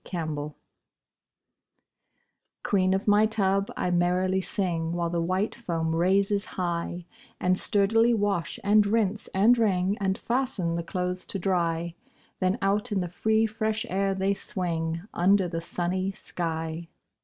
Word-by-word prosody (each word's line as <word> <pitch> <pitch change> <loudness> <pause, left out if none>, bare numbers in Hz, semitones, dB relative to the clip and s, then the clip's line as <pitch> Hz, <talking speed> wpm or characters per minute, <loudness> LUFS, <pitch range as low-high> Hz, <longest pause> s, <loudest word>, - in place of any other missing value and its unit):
8 - - -14
Autoplay 150 -3 -3 2.1
Queen 190 -3 +2
of 195 - -3
my 210 +1 +5
tub, 195 -2 +1
I 180 - 0
merrily 180 +2 +2
sing, 170 -4 -2
While 170 -1 -1
the 170 -1 0
white 185 +5 0
foam 165 -8 -2
raises 195 +4 +2
high, 175 -1 -3 0.3
And 180 0 +2
sturdily 225 +4 +2
wash, 200 -5 -1
and 210 +1 +5
rinse, 215 0 0
and 210 +6 +4
wring, 195 -3 +2
And 190 -1 0
fasten 235 -9 -1
the 170 - -1
clothes 180 +1 -3
to - - -3
dry; 170 -3 0 0.5
Then 185 +3 +1
out 210 +4 +1
in 200 - +1
the 175 - -3
free 220 +5 +2
fresh 220 +1 -2
air 195 +1 0
they 190 +1 +1
swing, 165 -4 -3
Under 190 +1 +3
the 165 -1 -4
sunny 185 +3 -2
sky. 165 -2 -4
185 Hz, 145 wpm, -27 LUFS, 170-205 Hz, 2.1 s, my